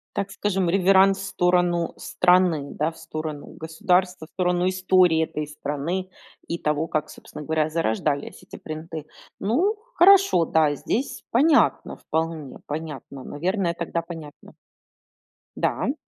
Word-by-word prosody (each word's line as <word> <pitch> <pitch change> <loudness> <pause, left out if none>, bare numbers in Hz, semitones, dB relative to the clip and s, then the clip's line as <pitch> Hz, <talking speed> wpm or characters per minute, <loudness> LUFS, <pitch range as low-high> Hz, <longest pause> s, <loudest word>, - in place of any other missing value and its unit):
Так 195 0 -2
скажем, 195 -3 -1
реверанс 195 +1 +4
в 195 - -6
сторону 180 -2 +1
страны, 180 -5 +2
да, 155 +2 0
в 165 - -17
сторону 155 -2 -6
государства, 180 +1 0
в - - -32
сторону 180 0 +1
истории 185 -3 +3
этой 150 -1 -4
страны 150 +6 -4 0.4
и 170 - -3
того, 150 +1 0
как 155 -1 -2
собственно - - -10
говоря 155 0 0
зарождались 145 -1 -2
эти - - -11
принты. 155 0 -7 0.3
Ну 330 - +1 0.2
хорошо, 380 - +6
да, 155 -2 +2
здесь 255 - -3
понятно 290 +6 +3
вполне, 160 -3 -3
понятно, 145 -3 -6
наверное 175 +3 -1
тогда 170 0 -3
понятно. 160 -4 -10 1.0
Да, - - 0
м. 265 - +1
170 Hz, 130 wpm, -24 LUFS, 155-185 Hz, 1.0 s, хорошо